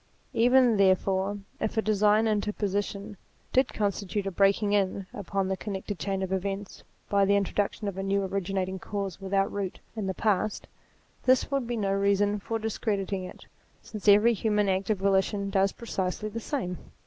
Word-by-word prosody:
Even, 245 Hz, -1 st, +5 dB
therefore, 195 Hz, +1 st, +2 dB, 0.2 s
if 220 Hz, +1 st, -2 dB
a -, -, +4 dB
divine 215 Hz, +1 st, +3 dB
interposition 205 Hz, -1 st, -2 dB, 0.4 s
did 260 Hz, 0 st, +3 dB
constitute 200 Hz, -1 st, -2 dB
a 195 Hz, -, -2 dB
breaking 200 Hz, +2 st, +3 dB
in 195 Hz, -1 st, +1 dB
upon 200 Hz, -3 st, -2 dB
the 190 Hz, -, 0 dB
connected 195 Hz, 0 st, -5 dB
chain 195 Hz, -1 st, -2 dB
of 190 Hz, 0 st, -2 dB
events, 195 Hz, +1 st, -3 dB, 0.3 s
by 200 Hz, -1 st, +3 dB
the 200 Hz, +1 st, +4 dB
introduc 200 Hz, 0 st, 0 dB
tion 210 Hz, -, -6 dB
of 195 Hz, -1 st, -4 dB
a -, -, -1 dB
new 195 Hz, +1 st, 0 dB
originating 190 Hz, 0 st, -2 dB
cause 200 Hz, -2 st, -4 dB
without 195 Hz, 0 st, 0 dB
root 195 Hz, -2 st, -3 dB, 0.2 s
in 210 Hz, -3 st, -3 dB
the 190 Hz, -, -2 dB
past, 210 Hz, +1 st, 0 dB, 0.6 s
this 260 Hz, +2 st, +3 dB
would 275 Hz, -4 st, 0 dB
be 240 Hz, 0 st, -2 dB
no 195 Hz, -2 st, 0 dB
reason 200 Hz, +1 st, +2 dB
for 225 Hz, +3 st, -3 dB
discrediting 200 Hz, -3 st, -2 dB
it, -, -, -11 dB, 0.4 s
since 215 Hz, -1 st, -8 dB
every 210 Hz, +3 st, +7 dB
human 210 Hz, -1 st, +1 dB
act 190 Hz, +1 st, 0 dB
of 215 Hz, -, +2 dB
volition 195 Hz, +1 st, +1 dB
does 195 Hz, 0 st, +3 dB
precisely 210 Hz, -2 st, -3 dB
the 225 Hz, +2 st, -5 dB
same. 210 Hz, -, -3 dB
200 Hz, 170 wpm, -28 LUFS, 195-210 Hz, 0.6 s, every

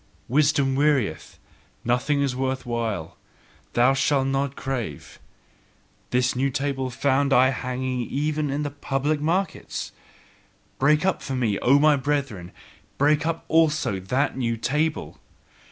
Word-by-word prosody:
"Wisdom 140 Hz, 0 st, +2 dB
wearieth, 130 Hz, -, 0 dB, 0.5 s
nothing 130 Hz, +4 st, +1 dB
is 135 Hz, -3 st, -1 dB
worth 130 Hz, 0 st, -2 dB
while; 115 Hz, -8 st, -3 dB, 0.6 s
thou 125 Hz, +3 st, +4 dB
shalt 135 Hz, 0 st, +1 dB
not 135 Hz, 0 st, -1 dB
crave!" 120 Hz, -, -5 dB, 0.9 s
this 125 Hz, 0 st, +1 dB
new 135 Hz, +2 st, +1 dB
table 135 Hz, -1 st, -2 dB
found 140 Hz, +2 st, +1 dB
I 130 Hz, 0 st, +5 dB
hanging 130 Hz, -1 st, -3 dB
even 150 Hz, +1 st, -1 dB
in 145 Hz, +2 st, -1 dB
the 145 Hz, -, -3 dB
public 145 Hz, +1 st, -1 dB
markets. 175 Hz, +4 st, -2 dB, 0.9 s
Break 150 Hz, +5 st, +3 dB
up 190 Hz, -, +1 dB
for 135 Hz, -, -4 dB
me, 115 Hz, -6 st, 0 dB
O 135 Hz, +3 st, +4 dB
my 150 Hz, 0 st, +4 dB
brethren, 135 Hz, -10 st, -2 dB, 0.5 s
break 150 Hz, +2 st, +2 dB
up 165 Hz, 0 st, -3 dB
also 155 Hz, -11 st, +2 dB
that 125 Hz, +10 st, -1 dB
NEW 115 Hz, -3 st, -1 dB
table! 150 Hz, +6 st, -2 dB
135 Hz, 130 wpm, -24 LUFS, 125-145 Hz, 0.9 s, I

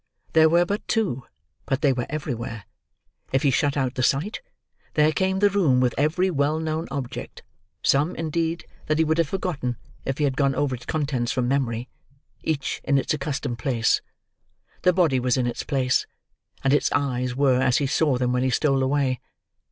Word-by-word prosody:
There 160 Hz, 0 st, +6 dB
were 170 Hz, +2 st, +4 dB
but 205 Hz, +4 st, -3 dB
two, 185 Hz, -, 0 dB, 0.4 s
but 135 Hz, -1 st, 0 dB
they 140 Hz, -3 st, +4 dB
were 120 Hz, -1 st, -3 dB
everywhere. 120 Hz, -8 st, -4 dB, 0.7 s
If 135 Hz, -, +1 dB
he 140 Hz, -, +4 dB
shut 140 Hz, +2 st, +1 dB
out 130 Hz, -2 st, 0 dB
the 130 Hz, -, -2 dB
sight, 145 Hz, -, 0 dB, 0.5 s
there 150 Hz, 0 st, +4 dB
came 190 Hz, +3 st, 0 dB
the 205 Hz, +1 st, +4 dB
room 165 Hz, -11 st, +3 dB
with 125 Hz, -1 st, +2 dB
every 165 Hz, +7 st, +1 dB
well 150 Hz, 0 st, +1 dB
known 160 Hz, +1 st, -2 dB
object—some, 140 Hz, +3 st, -3 dB
indeed, 165 Hz, +1 st, -2 dB, 0.2 s
that 155 Hz, -, +1 dB
he 160 Hz, -, +4 dB
would 160 Hz, +1 st, +1 dB
have 165 Hz, -, +3 dB
forgotten, 155 Hz, -11 st, -2 dB, 0.3 s
if 135 Hz, 0 st, -2 dB
he 150 Hz, -, 0 dB
had 135 Hz, -2 st, +1 dB
gone 135 Hz, -1 st, +2 dB
over 140 Hz, -1 st, 0 dB
its 125 Hz, -, -7 dB
contents 140 Hz, -6 st, -1 dB
from 125 Hz, -1 st, 0 dB
memory—each 135 Hz, +3 st, -3 dB
in 140 Hz, 0 st, +2 dB
its 135 Hz, -, 0 dB
accustomed 140 Hz, -4 st, -3 dB
place. 115 Hz, -2 st, +1 dB, 0.8 s
The 180 Hz, -, +5 dB
body 165 Hz, -8 st, +2 dB
was 125 Hz, 0 st, +1 dB
in 125 Hz, -, +1 dB
its 120 Hz, -, -2 dB
place, 130 Hz, -3 st, 0 dB, 0.6 s
and 135 Hz, -, +3 dB
its 145 Hz, -, +2 dB
eyes 125 Hz, -3 st, 0 dB
were 130 Hz, -2 st, +3 dB
as 130 Hz, -2 st, +3 dB
he 145 Hz, -, +1 dB
saw 140 Hz, 0 st, +2 dB
them 125 Hz, 0 st, 0 dB
when 125 Hz, -, +1 dB
he 130 Hz, -, +1 dB
stole 135 Hz, +1 st, +2 dB
away. 130 Hz, -2 st, +1 dB
140 Hz, 185 wpm, -24 LUFS, 130-155 Hz, 0.8 s, There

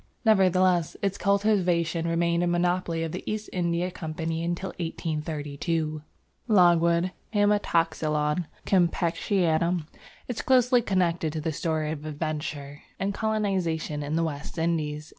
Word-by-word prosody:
Nevertheless 185 Hz, -5 st, +3 dB
its 195 Hz, -1 st, -1 dB
cultivation 180 Hz, -5 st, +1 dB
remained 170 Hz, 0 st, +1 dB
a 175 Hz, -, +1 dB
monopoly 175 Hz, -1 st, 0 dB
of 165 Hz, -, -3 dB
the -, -, -5 dB
East 215 Hz, 0 st, -4 dB
India 175 Hz, 0 st, 0 dB
Company 160 Hz, 0 st, -4 dB
until 175 Hz, +3 st, -2 dB
1832. 155 Hz, -1 st, -3 dB, 0.5 s
Logwood 175 Hz, -3 st, +4 dB, 0.2 s
(Haematoxylon 165 Hz, -6 st, +1 dB, 0.2 s
campechianum) 170 Hz, -2 st, +1 dB, 0.4 s
is 245 Hz, -3 st, -3 dB
closely 250 Hz, -1 st, +4 dB
connected 175 Hz, -6 st, 0 dB
with 155 Hz, -, -3 dB
the 160 Hz, -, 0 dB
story 155 Hz, 0 st, -1 dB
of 150 Hz, -2 st, -5 dB
adventure 150 Hz, -2 st, -4 dB, 0.2 s
and 200 Hz, +1 st, -1 dB
colonisation 190 Hz, -9 st, -1 dB
in 145 Hz, +2 st, -2 dB
the 165 Hz, -, +2 dB
West 150 Hz, -1 st, -5 dB
Indies. 155 Hz, -2 st, -1 dB
170 Hz, 120 wpm, -26 LUFS, 155-185 Hz, 0.5 s, Logwood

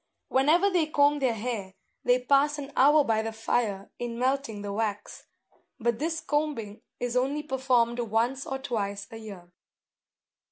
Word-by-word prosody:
Whenever 320 Hz, +9 st, +4 dB
they 345 Hz, -4 st, +2 dB
comb 290 Hz, -1 st, +3 dB
their 255 Hz, -4 st, +1 dB
hair, 210 Hz, -4 st, -4 dB, 0.3 s
they 245 Hz, 0 st, +4 dB
pass 280 Hz, +4 st, +2 dB
an 285 Hz, -1 st, -7 dB
hour 295 Hz, +3 st, +6 dB
by 220 Hz, -4 st, +1 dB
the 225 Hz, 0 st, -3 dB
fire 220 Hz, -3 st, -1 dB
in 240 Hz, -1 st, -4 dB
melting 255 Hz, -4 st, -1 dB
the 200 Hz, -1 st, -4 dB
wax; 210 Hz, -1 st, -3 dB, 0.5 s
but 235 Hz, 0 st, 0 dB
this 325 Hz, +2 st, -2 dB
combing 290 Hz, -9 st, -2 dB, 0.2 s
is 245 Hz, 0 st, -2 dB
only 275 Hz, +4 st, 0 dB
performed 255 Hz, -4 st, +1 dB
once 235 Hz, +4 st, 0 dB
or 270 Hz, -, -2 dB
twice 205 Hz, -7 st, -3 dB
a 225 Hz, -, -7 dB
year. 195 Hz, -6 st, -10 dB
245 Hz, 155 wpm, -27 LUFS, 220-280 Hz, 0.5 s, hour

